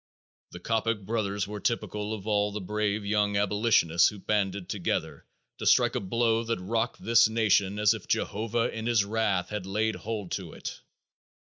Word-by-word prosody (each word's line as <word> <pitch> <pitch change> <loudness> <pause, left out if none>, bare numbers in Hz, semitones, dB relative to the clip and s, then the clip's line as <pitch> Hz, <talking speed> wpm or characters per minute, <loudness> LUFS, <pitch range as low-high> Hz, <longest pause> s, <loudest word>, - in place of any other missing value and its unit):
The 90 - -10
Coppock 115 +2 -1
brothers 100 -3 -1
were 105 0 -6
typical 105 -2 -2
of 100 -2 -10
all 105 -1 +1
the 105 - -4
brave 105 +1 -2
young 105 0 +1
abolitionists 100 -5 +3
who 105 - -9
banded 100 -2 -1
together 95 -2 -3 0.3
to - - -2
strike - - +5
a - - 0
blow 115 +3 +1
that 115 -2 -2
rocked 115 +5 -2
this 115 +1 +5
nation 105 -3 +2
as 105 -1 +4
if - - -8
Jehovah 115 +2 -1
in 110 +1 -4
his 115 -4 +3
wrath 100 -4 0
had 105 -3 -5
laid 110 +3 0
hold 105 -5 -4
on - - -10
it. - - -7
105 Hz, 170 wpm, -28 LUFS, 100-110 Hz, 0.3 s, strike